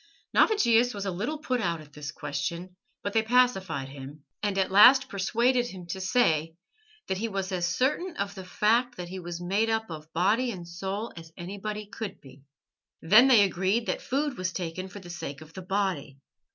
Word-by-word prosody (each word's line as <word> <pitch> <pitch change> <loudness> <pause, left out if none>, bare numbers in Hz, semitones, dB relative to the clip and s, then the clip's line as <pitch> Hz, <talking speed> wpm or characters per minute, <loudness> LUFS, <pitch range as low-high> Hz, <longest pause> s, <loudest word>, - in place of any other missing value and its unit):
Navigius 245 - +4
was 200 0 -4
a 195 - -1
little 215 - -3
put 255 -5 -1
out 170 -5 -1
at 150 -1 -14
this 150 -1 -6
question, 170 +5 -4 0.3
but 200 - -3
they 225 - +4
pacified 205 - +1
him, 140 +2 -10 0.2
and 205 -2 -1
at 190 -1 +1
last 250 +7 +8
persuaded 240 +6 +1
him 185 -6 -9
to 190 +2 -4
say 165 -7 +2 0.5
that 190 - -2
he 230 - -1
was 195 -3 -3
as 175 -2 0
certain 285 - 0
of 200 0 -2
the 190 -2 -8
fact 230 +6 +1
that 175 -1 -6
he 190 +1 -6
was 175 -1 -6
made 200 +6 0
up 220 -3 -1
of 155 0 -9
body 210 +10 +2
and 180 -6 -6
soul 195 +6 -4
as 165 -1 -11
anybody 205 +4 -5
could 210 0 -7
be. 135 0 -16 0.6
They 160 - -10
then 240 +7 +8
agreed 205 -1 +3
that - - -2
food 275 -1 -2
was 185 0 -1
taken 185 0 -4
for 190 - -11
the 180 -3 -9
sake 145 -5 -6
of 155 +1 -14
the 190 - -7
body. 185 -8 -2
190 Hz, 195 wpm, -28 LUFS, 175-225 Hz, 0.6 s, last